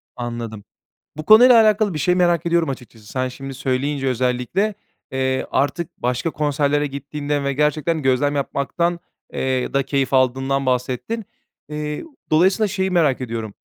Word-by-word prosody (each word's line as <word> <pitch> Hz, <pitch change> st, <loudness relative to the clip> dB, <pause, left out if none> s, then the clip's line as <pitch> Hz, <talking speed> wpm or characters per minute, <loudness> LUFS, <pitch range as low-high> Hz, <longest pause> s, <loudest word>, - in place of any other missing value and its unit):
Anladım. 120 Hz, -3 st, -5 dB, 0.5 s
Bu 155 Hz, -, -6 dB
konuyla 235 Hz, +3 st, +8 dB
alakalı 215 Hz, -2 st, +3 dB
bir 155 Hz, -, -3 dB
şey 180 Hz, +5 st, +2 dB
merak 175 Hz, -2 st, +2 dB
ediyorum 170 Hz, -2 st, +2 dB
açıkçası. 120 Hz, -5 st, -8 dB
Sen 130 Hz, +3 st, -2 dB
şimdi 135 Hz, +2 st, -8 dB
söyleyince 135 Hz, +1 st, -1 dB
özellikle, 125 Hz, -, 0 dB, 0.4 s
eee, 130 Hz, 0 st, -1 dB
artık 165 Hz, +4 st, 0 dB
başka 125 Hz, +6 st, -1 dB
konserlere 145 Hz, 0 st, 0 dB
gittiğinden 145 Hz, +1 st, -3 dB
ve 140 Hz, -, 0 dB
gerçekten 150 Hz, +3 st, 0 dB
gözlem 135 Hz, +2 st, +1 dB
yapmaktan 170 Hz, +5 st, -1 dB, 0.3 s
eee, 130 Hz, -1 st, -1 dB
da 140 Hz, 0 st, +2 dB
keyif 135 Hz, 0 st, -1 dB
aldığından 135 Hz, +1 st, +1 dB
bahsettin. 130 Hz, -, -2 dB, 0.4 s
Eee, 150 Hz, 0 st, -4 dB, 0.3 s
dolayısıyla 190 Hz, +7 st, +4 dB
şeyi 190 Hz, -1 st, -1 dB
merak 155 Hz, -8 st, +2 dB
ediyorum. 115 Hz, -4 st, -4 dB
140 Hz, 140 wpm, -21 LUFS, 130-170 Hz, 0.5 s, konuyla